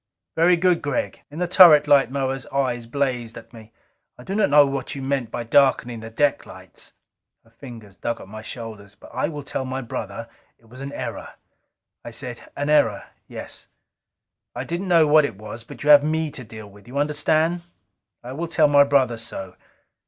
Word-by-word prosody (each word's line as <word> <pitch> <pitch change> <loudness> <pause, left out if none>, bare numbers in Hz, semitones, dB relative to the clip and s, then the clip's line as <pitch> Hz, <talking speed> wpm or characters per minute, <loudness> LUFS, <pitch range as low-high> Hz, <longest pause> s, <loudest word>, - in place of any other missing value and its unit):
"Very 175 +2 +4
good, 180 0 +2
Gregg." 145 -3 -3
In 145 - -11
the 180 +1 -1
turret 170 -5 +7
light 140 -3 +5
Moa's 135 -1 -3
eyes 125 -4 -2
blazed 125 -3 -2
at 115 0 -13
me. 110 -1 -14 0.5
"I 125 - -12
do 190 - -5
not 210 -4 +2
know 145 0 +7
what 135 -1 -4
you 140 - -6
meant 135 -3 -1
by 120 - -4
darkening 120 -1 +2
the 115 0 -8
deck 145 +6 0
lights." - - -12 0.5
Her 115 - -26
fingers 115 -5 -12
dug 120 - -3
at - - -11
my 110 +2 -9
shoulders. 110 -3 -9 0.2
"I 125 - -1
will 150 -3 -7
tell 135 - -3
my 130 +1 -4
brother 115 -1 -6 0.3
it 115 - -27
was 125 +4 -13
an 140 0 -6
error." - - -6 0.7
I - - -7
said, 120 +1 -7 0.2
"An 145 - -2
error 145 -9 +2 0.2
yes." - - -9 0.9
"I - - -3
didn't 175 +3 -4
know 170 -3 +5
what 155 +1 +5
it 115 -9 -4
was. 110 +2 -9
But 115 - -11
you 150 - +5
have 145 -1 +8
me 160 0 -1
to 130 - -7
deal 110 -1 -10
with 100 +2 -17
now. 125 - -12
You - - -4
understand? 155 +3 +1 0.6
I 125 +2 -7
will 165 +5 -4
tell 160 -2 +3
my 145 -1 +6
brother 130 -5 +1
so. 95 -5 -6
135 Hz, 195 wpm, -22 LUFS, 115-150 Hz, 0.9 s, have